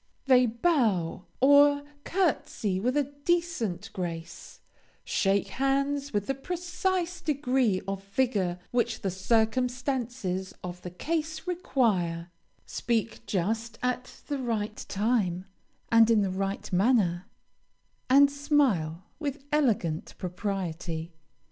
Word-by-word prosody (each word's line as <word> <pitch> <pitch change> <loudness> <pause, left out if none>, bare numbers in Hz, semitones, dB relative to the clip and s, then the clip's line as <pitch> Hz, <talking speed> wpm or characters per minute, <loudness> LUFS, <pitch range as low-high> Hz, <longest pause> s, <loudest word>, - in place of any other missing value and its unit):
They 255 -2 +6
bow 225 - +1
or 285 +1 +6 0.2
courtesy 275 - 0
with 250 +7 0
a 290 - +4 0.2
decent 335 - -1
grace; 170 -3 -6 0.4
shake 195 0 +1
hands 275 +1 0
with 205 -2 0
the 270 - 0
precise 355 +4 -2
degree 260 -9 +1
of 195 0 -3
vigor 200 -5 0
which 240 -2 0
the 195 - -1
circumstances 235 -1 0
of 180 0 -6
the 180 - -6
case 315 - -3
require; 200 - 0 0.3
speak 230 -1 -2
just 225 +5 -1
at 250 0 -3
the 285 -2 -3
right 220 -4 -2
time, 200 -4 0 0.5
and 230 0 +6
in 220 -3 +4
the 190 - -1
required 195 +1 -3
manner, 190 -3 +2 0.8
and 280 +2 +7
smile 265 - +1 0.2
with 285 -3 -4
elegant 225 - +1
propriety. 175 -3 -4
230 Hz, 110 wpm, -28 LUFS, 190-275 Hz, 0.8 s, and